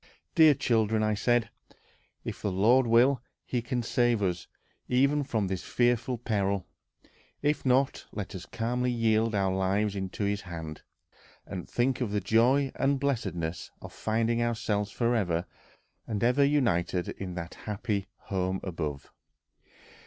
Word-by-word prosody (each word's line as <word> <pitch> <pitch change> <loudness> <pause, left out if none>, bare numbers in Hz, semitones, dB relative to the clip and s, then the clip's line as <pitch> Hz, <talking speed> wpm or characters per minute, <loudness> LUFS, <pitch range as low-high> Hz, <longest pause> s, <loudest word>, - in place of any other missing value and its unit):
"Dear 160 -4 +7
children," 110 -4 +1
said 120 0 +1 0.2
I, - - -24 0.5
"if - - -5
the 100 - -1
Lord 115 +7 +4
will, 120 +3 +4 0.2
he 125 - -1
can 120 +1 -2
save 120 -2 +2
us 90 -2 -1 0.4
even 140 +4 +3
from 110 -6 -1
this 95 -1 -3
fearful 120 0 +1
peril; 100 -4 -1 0.8
if 150 0 +1
not, 130 +2 +2
let 105 -3 -5
us 90 -3 -7
calmly 125 +2 -1
yield 115 -2 +2
our 95 -1 +1
lives 95 +2 +1
into 95 +1 -3
his 100 +1 0
hand, 80 -4 -7 0.6
and 90 - -7
think 130 +2 0
of 120 - 0
the 105 0 0
joy 120 +7 +3
and 135 0 +1
blessedness 95 - -2
of - - -10
finding 115 +1 0
ourselves 110 -3 0
forever 100 -7 0 0.6
and 105 -2 -2
ever 125 +4 +4
united 95 - +1
in 90 -2 -6
that 85 -1 -6
happy 105 -1 -3
home 95 -1 -2
above." 75 -6 -5
110 Hz, 140 wpm, -29 LUFS, 95-125 Hz, 0.8 s, Dear